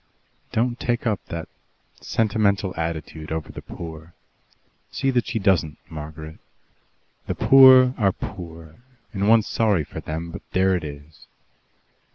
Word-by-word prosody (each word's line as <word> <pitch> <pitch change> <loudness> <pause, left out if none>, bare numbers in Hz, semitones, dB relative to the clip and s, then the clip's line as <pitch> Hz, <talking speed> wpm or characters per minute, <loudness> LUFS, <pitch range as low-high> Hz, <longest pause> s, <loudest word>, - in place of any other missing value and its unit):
Don't 120 +2 0
take 120 0 -1
up 110 -3 -1
that 85 -1 -6 0.5
sentimental 100 -4 0
attitude 80 -1 -5
over 80 -1 -4
the - - -9
poor. 80 0 -10 0.7
See 135 -1 -1
that 120 -2 0
she - - -2
doesn't, 95 -7 +1
Margaret. 80 0 -8 0.9
The - - -2
poor 130 -1 +7
are 100 -3 +3
poor, 80 -3 -9 0.4
and 100 0 0
one's 115 -2 +5
sorry 105 -8 +1
for - - -8
them, 80 +2 -5
but - - -8
there 95 0 +3
it 90 - -3
is. 75 +1 -10
90 Hz, 135 wpm, -23 LUFS, 80-110 Hz, 0.9 s, poor